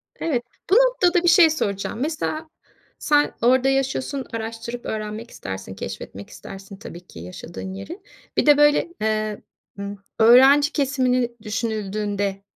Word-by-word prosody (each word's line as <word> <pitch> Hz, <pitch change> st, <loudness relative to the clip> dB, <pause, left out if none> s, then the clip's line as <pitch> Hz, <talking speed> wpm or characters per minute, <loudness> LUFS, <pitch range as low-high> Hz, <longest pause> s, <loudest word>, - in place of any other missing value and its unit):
Evet. 250 Hz, -7 st, -1 dB, 0.3 s
Bu 390 Hz, -, +4 dB
noktada 390 Hz, -9 st, +4 dB
bir -, -, +1 dB
şey 330 Hz, -1 st, +7 dB
soracağım. 205 Hz, -7 st, -2 dB
Mesela 315 Hz, +1 st, -3 dB, 0.5 s
sen 295 Hz, -1 st, +2 dB
orada 260 Hz, +2 st, +4 dB
yaşıyorsun, 270 Hz, 0 st, -1 dB
araştırıp 230 Hz, +2 st, -5 dB
öğrenmek 215 Hz, +2 st, -5 dB
istersin, 95 Hz, 0 st, -7 dB
keşfetmek 100 Hz, +1 st, -8 dB
istersin 195 Hz, 0 st, -11 dB
tabii 180 Hz, -4 st, -11 dB
ki 85 Hz, -, -12 dB
yaşadığın 165 Hz, -, -8 dB
yeri. 320 Hz, -, -8 dB, 0.4 s
Bir -, -, +3 dB
de, 295 Hz, -1 st, +6 dB
böyle, 295 Hz, +3 st, +4 dB
eee, 215 Hz, -1 st, -1 dB, 0.4 s
ımm, 200 Hz, 0 st, -5 dB, 0.2 s
öğrenci 270 Hz, +6 st, +7 dB
kesimini 255 Hz, -4 st, +1 dB
düşünüldüğünde 205 Hz, -2 st, -3 dB
235 Hz, 130 wpm, -22 LUFS, 200-290 Hz, 0.5 s, şey